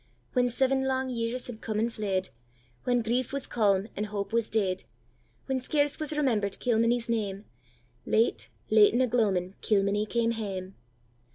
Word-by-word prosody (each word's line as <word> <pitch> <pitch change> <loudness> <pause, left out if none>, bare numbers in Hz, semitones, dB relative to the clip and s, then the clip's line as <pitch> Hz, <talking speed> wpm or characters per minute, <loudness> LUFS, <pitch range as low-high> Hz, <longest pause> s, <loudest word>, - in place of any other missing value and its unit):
When 245 -1 +3
seven 265 +2 +1
lang 260 0 0
years 235 +1 -2
had 225 -3 -8
come 215 -2 -3
and 230 +2 0
fled, 190 -4 -1 0.6
When 245 -2 +2
grief 240 +2 0
was 275 -1 -2
calm, 200 -3 +2
and 210 +1 -2
hope 205 +1 -4
was 230 -1 +1
dead; 190 -4 0 0.6
When 265 -1 -1
scarce 290 +2 0
was 310 -1 -2
remember'd 215 -9 +1
Kilmeny's 235 0 +2
name. 210 -3 -2 0.6
Late, 225 +2 +1 0.2
late 215 0 +6
in 250 - +3
a 255 - +3
gloamin' 195 -6 +1
Kilmeny 205 0 +1
came 230 +1 +1
hame! 195 -4 -4
225 Hz, 160 wpm, -28 LUFS, 205-245 Hz, 0.6 s, late